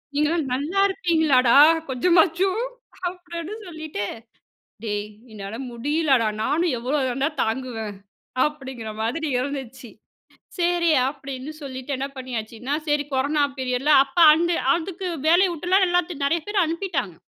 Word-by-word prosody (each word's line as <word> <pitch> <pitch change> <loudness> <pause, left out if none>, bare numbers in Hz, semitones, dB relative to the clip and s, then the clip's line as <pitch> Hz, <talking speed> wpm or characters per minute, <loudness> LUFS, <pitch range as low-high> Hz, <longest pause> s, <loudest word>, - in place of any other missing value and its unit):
நீங்கள்லாம் 300 +1 +1
நல்லாயிருப்பீங்களாடா, 320 - +2 0.3
கொஞ்சமாச்சும்.'' 360 - +2 0.4
அப்படின்னு 350 +1 -6
சொல்லிட்டு, 315 - -5 0.8
டேய் 205 -1 -2 0.2
என்னால 205 +1 -7
முடியலடா. 270 0 +1 0.2
நானும் 325 +2 +1
எவ்வளோ 260 +5 -1
தாண்டா 270 +4 0
தாங்குவேன்? 225 -3 -3 0.5
அப்படிங்கிற 265 -7 -5
மாதிரி 315 +8 -2
இருந்துச்சு. 260 -2 -5 0.7
சேரி, 345 -1 +2 0.2
அப்டின்னு 275 0 -6
சொல்லிட்டு 260 0 -6
என்ன 275 +1 -2
பண்ணியாச்சுன்னா, 245 +1 -5
சரி 295 0 +1
கொரானா 285 +3 +1
பீரியட்ல, 260 +3 0
அப்ப 275 +5 -19 0.2
அந்த 340 +2 +1 0.2
அதுக்கு 365 +2 -4 0.2
வேலய 360 +3 +5
விட்றலாம். 370 +4 +2
எல்லாத்தையும், 350 -5 0
நெறைய 330 +2 0
பேர 410 -1 +1
அனுப்பிட்டாங்க. 330 - -3
290 Hz, 110 wpm, -23 LUFS, 255-340 Hz, 0.8 s, வேலய